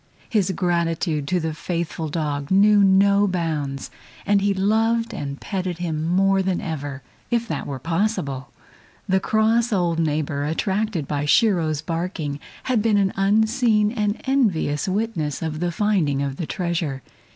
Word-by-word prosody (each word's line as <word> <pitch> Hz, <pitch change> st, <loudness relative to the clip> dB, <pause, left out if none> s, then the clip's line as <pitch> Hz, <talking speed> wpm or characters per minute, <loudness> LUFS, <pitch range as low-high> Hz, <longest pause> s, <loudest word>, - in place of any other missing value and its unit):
His 205 Hz, -6 st, +1 dB
gratitude 170 Hz, -4 st, 0 dB
to 180 Hz, +2 st, +1 dB
the 160 Hz, -1 st, -2 dB
faithful 165 Hz, -1 st, -3 dB
dog 145 Hz, -3 st, -2 dB
knew 205 Hz, +1 st, +5 dB
no 200 Hz, +1 st, +4 dB
bounds, 155 Hz, -7 st, -2 dB, 0.3 s
and 200 Hz, 0 st, +3 dB
he 200 Hz, 0 st, +2 dB
loved 225 Hz, +4 st, +1 dB
and 140 Hz, 0 st, -5 dB
petted 185 Hz, -3 st, -3 dB
him 160 Hz, -3 st, -2 dB
more 195 Hz, +2 st, +3 dB
than 190 Hz, -1 st, 0 dB
ever, 145 Hz, -7 st, -5 dB, 0.3 s
if 235 Hz, -1 st, 0 dB
that -, -, -4 dB
were 140 Hz, -, -4 dB
possible. 150 Hz, -, -2 dB, 0.6 s
The 190 Hz, 0 st, +3 dB
cross 220 Hz, +4 st, +2 dB
old 175 Hz, -4 st, +1 dB
neighbor, 150 Hz, -2 st, -1 dB
attracted 190 Hz, +1 st, -1 dB
by 145 Hz, -1 st, -1 dB
Shiro's 160 Hz, -4 st, +2 dB
barking, 165 Hz, -4 st, -3 dB, 0.2 s
had 250 Hz, -4 st, +1 dB
been 215 Hz, -1 st, +3 dB
an 195 Hz, -1 st, +2 dB
unseen 215 Hz, +2 st, +2 dB
and 210 Hz, -2 st, -1 dB
envious 200 Hz, -, +1 dB
witness 185 Hz, -8 st, -2 dB
of 155 Hz, -1 st, -3 dB
the 175 Hz, 0 st, -1 dB
finding 165 Hz, -8 st, +1 dB
of 140 Hz, -1 st, -3 dB
the 165 Hz, -, -4 dB
treasure. 170 Hz, -7 st, -2 dB
180 Hz, 150 wpm, -22 LUFS, 155-205 Hz, 0.6 s, knew